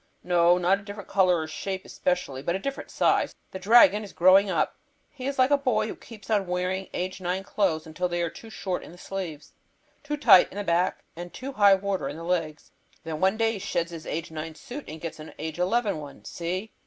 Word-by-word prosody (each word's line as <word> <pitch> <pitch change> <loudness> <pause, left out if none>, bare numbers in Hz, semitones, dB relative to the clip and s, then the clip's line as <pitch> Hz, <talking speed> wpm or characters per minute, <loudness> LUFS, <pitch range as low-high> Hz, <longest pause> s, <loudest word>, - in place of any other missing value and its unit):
"No; 175 0 +4
not 180 +2 +2
a - - -13
different 205 0 -9
color 185 -2 +3
or 160 - -2
different 155 - -8
shape 190 -1 -4
especially, 180 -7 -2
but 170 +5 -1
a - - +1
different 275 +8 -5
size. - - +1 0.2
The 190 - -6
dragon 210 0 +6
is 205 - -10
growing 190 +3 +6
up. 170 -4 0 0.4
He 265 -2 -6
is 275 - -3
like 255 +2 +4
a 285 - +5
boy 235 -6 +1
who 220 - -5
keeps 225 -1 -11
on 200 -3 +2
wearing 180 +1 -2
age 185 +1 -4
nine 185 +2 -2
clothes 185 -6 0
until 170 +3 -3
they 175 0 -1
are 170 - -1
too 225 - -12
short 190 -4 -3
in - - -11
the - - -14
sleeves, 180 -6 -6 0.5
too 295 +1 -3
tight 190 -10 +7
in - - -9
the 205 - -2
back, 175 0 +1
and 175 +1 -7
too 270 +2 -6
high 205 -5 +6
water 190 -7 -2
in 145 - -7
the 165 - -8
legs. 165 -3 -2 0.3
Then 160 -1 -5
one 190 +4 +2
day 225 0 +2
he 215 - -5
sheds 175 -3 -2
his 165 -1 -8
age 160 +1 -4
nine 160 0 -6
suit 275 - -8
and 160 - -8
gets 165 0 -6
an 155 - -10
age 160 +2 -5
eleven 200 0 +1
one. 145 -2 -11
See?" 185 +5 -4
185 Hz, 235 wpm, -26 LUFS, 170-205 Hz, 0.5 s, tight